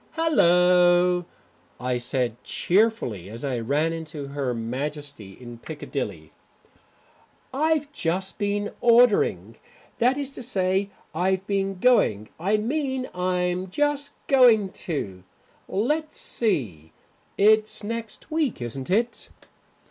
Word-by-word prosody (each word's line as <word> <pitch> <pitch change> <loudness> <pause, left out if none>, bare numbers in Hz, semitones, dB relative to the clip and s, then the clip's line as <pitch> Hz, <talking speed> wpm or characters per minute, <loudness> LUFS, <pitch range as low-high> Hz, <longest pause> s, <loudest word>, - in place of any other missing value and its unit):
"Hallo," 180 - +4 0.5
I 125 -1 -1
said 120 -1 -2
cheerfully, 180 - 0
as 115 +6 -6
I 130 -3 -1
ran 145 +8 0
into 155 -3 -7
Her 140 -2 -2
Majesty 130 -1 -5
in 120 -2 -10
Piccadilly, 120 - -6 1.2
"I've 300 +1 +1
just 190 - -2
been 205 0 -1
ordering 215 - +4 0.4
that 250 +3 +3
is 280 -1 -4
to - - -8
say, 195 -4 0 0.2
I've 190 +3 0
been 195 -1 -1
going 110 - +3
I 200 +6 +1
mean 260 +2 -2
I'm 180 0 -1
just 290 +5 -1
going 235 -7 +5 0.2
to 100 - -3 0.5
Let's 300 - -1
see, 130 - -2 0.4
it's 215 +1 +3
next 230 +7 -6
week, 310 -6 0
isn't 125 +4 -6
it?" 230 +5 0
180 Hz, 110 wpm, -25 LUFS, -, 1.2 s, going